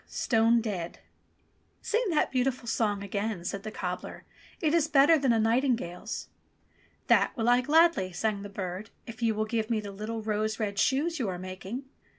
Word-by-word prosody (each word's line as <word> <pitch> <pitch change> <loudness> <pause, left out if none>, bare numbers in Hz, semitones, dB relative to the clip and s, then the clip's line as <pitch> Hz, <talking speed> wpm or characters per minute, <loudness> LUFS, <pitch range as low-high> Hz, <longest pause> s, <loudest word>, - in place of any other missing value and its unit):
Stone 230 0 +2
dead 190 -7 -4 0.4
!" - - -41
"Sing 455 +4 +1
that 315 -4 +1
beautiful 255 -1 0
song 205 -3 0
again," 200 -2 -3
said 200 - -3
the 215 - -6
cobbler. 180 -3 -5 0.4
"It 310 -2 +1
is 330 -2 +3
better 290 +2 +6
than 275 -5 +2
a 230 - +3
nightingale's." 225 -4 0 0.8
"That - - +3
will 225 0 0
I 245 +1 +5
gladly," 310 - +4
sang 200 +3 -1
the 205 - -7
bird, 195 +1 -5 0.2
"if 230 0 -10
you 225 -2 +2
will 215 +1 0
give 220 0 -2
me 225 -2 +1
the 205 -1 -6
little 215 +3 -5
rose 215 +1 -1
red 205 -2 -2
shoes 310 +7 +1
you 230 -6 -1
are 180 - -3
making." 185 +7 -6
220 Hz, 180 wpm, -29 LUFS, 200-255 Hz, 0.8 s, better